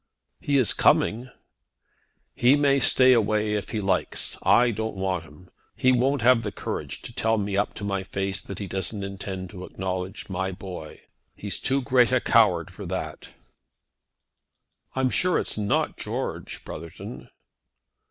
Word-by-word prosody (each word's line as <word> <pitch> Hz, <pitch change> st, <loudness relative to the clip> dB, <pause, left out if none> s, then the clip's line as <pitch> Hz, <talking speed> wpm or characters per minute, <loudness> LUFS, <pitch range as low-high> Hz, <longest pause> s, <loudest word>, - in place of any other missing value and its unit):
"He 140 Hz, -1 st, +1 dB
is 130 Hz, -5 st, +4 dB
coming." 120 Hz, +4 st, +2 dB, 1.0 s
"He 125 Hz, +3 st, +4 dB
may 140 Hz, -1 st, +3 dB
stay 130 Hz, -1 st, +6 dB
away 105 Hz, -2 st, +1 dB
if 105 Hz, -2 st, -2 dB
he 110 Hz, -, -2 dB
likes 100 Hz, -1 st, 0 dB
it. -, -, -11 dB
I 120 Hz, 0 st, +4 dB
don't 110 Hz, 0 st, -3 dB
want 95 Hz, -3 st, -2 dB
him. 80 Hz, +4 st, -17 dB, 0.2 s
He 130 Hz, -, +3 dB
won't 130 Hz, +1 st, +2 dB
have 125 Hz, -1 st, +5 dB
the 105 Hz, -2 st, -4 dB
courage -, -, -5 dB
to 120 Hz, -, -9 dB
tell 115 Hz, -1 st, +1 dB
me 100 Hz, -1 st, -2 dB
up 100 Hz, +1 st, 0 dB
to 100 Hz, -, -7 dB
my 100 Hz, -1 st, -1 dB
face 95 Hz, +1 st, -2 dB
that 100 Hz, -, -8 dB
he 100 Hz, -, -4 dB
doesn't 95 Hz, +2 st, -3 dB
intend 95 Hz, -2 st, -6 dB
to 90 Hz, -2 st, -9 dB
acknowledge 95 Hz, +1 st, -5 dB
my 95 Hz, 0 st, -2 dB
boy. 90 Hz, -5 st, -9 dB, 0.3 s
He's 100 Hz, -1 st, -3 dB
too 135 Hz, 0 st, +1 dB
great 125 Hz, -3 st, +4 dB
a -, -, +4 dB
coward -, -, +3 dB
for -, -, -8 dB
that." -, -, -5 dB, 1.7 s
"I'm 130 Hz, -1 st, +1 dB
sure 180 Hz, -1 st, +2 dB
it's -, -, -2 dB
not 105 Hz, -1 st, 0 dB
George, -, -, -5 dB
Brotherton." 80 Hz, -5 st, -9 dB
105 Hz, 160 wpm, -25 LUFS, 95-120 Hz, 1.7 s, stay